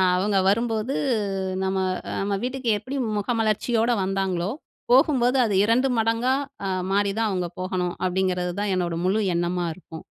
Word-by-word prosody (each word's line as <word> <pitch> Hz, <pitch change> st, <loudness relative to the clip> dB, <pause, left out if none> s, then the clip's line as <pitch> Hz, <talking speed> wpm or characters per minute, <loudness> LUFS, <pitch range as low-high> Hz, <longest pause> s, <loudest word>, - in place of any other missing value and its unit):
அ -, -, +4 dB
அவங்க 200 Hz, +2 st, +1 dB
வரும்போது 225 Hz, +4 st, 0 dB, 0.7 s
நம்ம 190 Hz, 0 st, 0 dB, 0.3 s
அ -, -, -4 dB
நம்ம 200 Hz, +1 st, -1 dB
வீட்டுக்கு 255 Hz, -1 st, -3 dB
எப்படி 255 Hz, +7 st, -6 dB, 0.2 s
முகமலர்ச்சியோட 225 Hz, +2 st, +1 dB
வந்தாங்களோ, 190 Hz, -1 st, -1 dB, 0.4 s
போகும்போது 260 Hz, -2 st, +4 dB
அது 210 Hz, -3 st, 0 dB
2 245 Hz, +5 st, +3 dB
மடங்கா 230 Hz, +3 st, +1 dB, 0.3 s
அ -, -, -1 dB, 0.2 s
மாறிதான் 205 Hz, +2 st, +1 dB
அவங்க 180 Hz, -2 st, -1 dB
போகணும். 185 Hz, -1 st, -2 dB
அப்பிடீங்கிறது 180 Hz, -1 st, 0 dB
தான் 205 Hz, -1 st, 0 dB
என்னோட 175 Hz, -2 st, -1 dB
முழு 195 Hz, +4 st, +2 dB
எண்ணமா 175 Hz, +1 st, 0 dB
இருக்கும். 160 Hz, -3 st, -11 dB
205 Hz, 140 wpm, -24 LUFS, 185-230 Hz, 0.7 s, அ